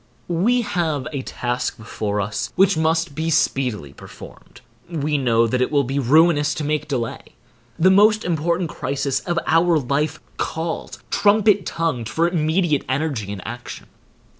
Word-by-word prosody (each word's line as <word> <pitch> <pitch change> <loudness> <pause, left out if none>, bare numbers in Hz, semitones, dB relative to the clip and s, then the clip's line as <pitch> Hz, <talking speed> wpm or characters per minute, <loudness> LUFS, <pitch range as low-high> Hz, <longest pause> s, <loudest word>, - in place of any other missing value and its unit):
We 220 +9 +2
have 160 - -1
a 140 - -2
task 125 -1 -3
before 105 -2 -3
us 105 +3 -3
which 195 0 +4
must 160 0 0
be 160 +3 -2
speedily 125 - 0
performed. - - -13 0.3
We 150 -3 -1
know 115 -3 +3
that 125 +2 0
it 125 - +1
will 145 -2 +3
be 135 +3 -2
ruinous 150 +2 +3
to 155 - -3
make 150 +1 -1
delay. 125 -6 -3 0.6
The 185 +3 +5
most 215 +3 +5
important 170 0 0
crisis 140 0 -2
of 175 -1 -3
our 165 +1 +3
life 145 +3 -1 0.2
calls, 160 0 -4
trumpet 205 -2 +3
tongued, 160 -9 -2
for 165 +1 +1
immediate 160 -2 +1
energy 130 -7 -2
and 100 -3 -7
action. 120 +2 -8
155 Hz, 150 wpm, -21 LUFS, 130-170 Hz, 0.6 s, The